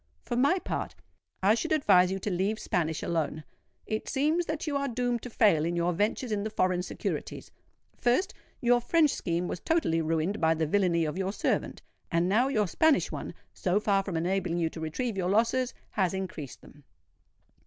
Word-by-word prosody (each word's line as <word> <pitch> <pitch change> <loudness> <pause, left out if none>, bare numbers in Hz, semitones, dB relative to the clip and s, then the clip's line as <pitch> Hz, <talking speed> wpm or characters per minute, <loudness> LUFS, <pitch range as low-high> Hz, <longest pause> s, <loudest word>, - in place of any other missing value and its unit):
For - - -3
my 280 +9 +3
part, - - -4 0.5
I 200 +3 +6
should 280 +8 -2
advise 195 -12 +4
you 190 - -1
to 205 - -2
leave 195 +4 0
Spanish 160 -6 -1
alone. 155 -2 -2 0.4
It 215 0 -3
seems 310 +5 +1
that 310 -1 -3
you 300 -3 -2
are 280 0 0
doomed 245 -1 -1
to 250 - -7
fail 205 -9 +3
in 170 +2 -1
your 170 +1 +1
ventures 210 +6 -1
in 205 -1 0
the 215 - -2
foreign 185 -4 +1
securities:—first, 250 - -3 0.3
your 240 0 +4
French 310 +2 +3
scheme 175 0 -2
was 175 - -4
totally 285 - +1
ruined 165 +5 -1
by 160 0 +3
the 160 0 0
villany 170 -1 +2
of 155 +4 -3
your 190 0 -1
servant; - - -2 0.3
and 170 +1 +2
now 225 +7 +3
your 215 -7 +1
Spanish 315 - +2
one, - - -6 0.2
so 185 +2 +1
far 200 -2 +2
from 185 -4 -3
enabling 175 0 -1
you 165 -2 0
to - - -8
retrieve 195 +8 -3
your 180 -1 0
losses, 235 +5 +2 0.2
has 190 -3 0
increased 175 -8 -6
them." 145 - -17
195 Hz, 185 wpm, -28 LUFS, 170-245 Hz, 0.5 s, I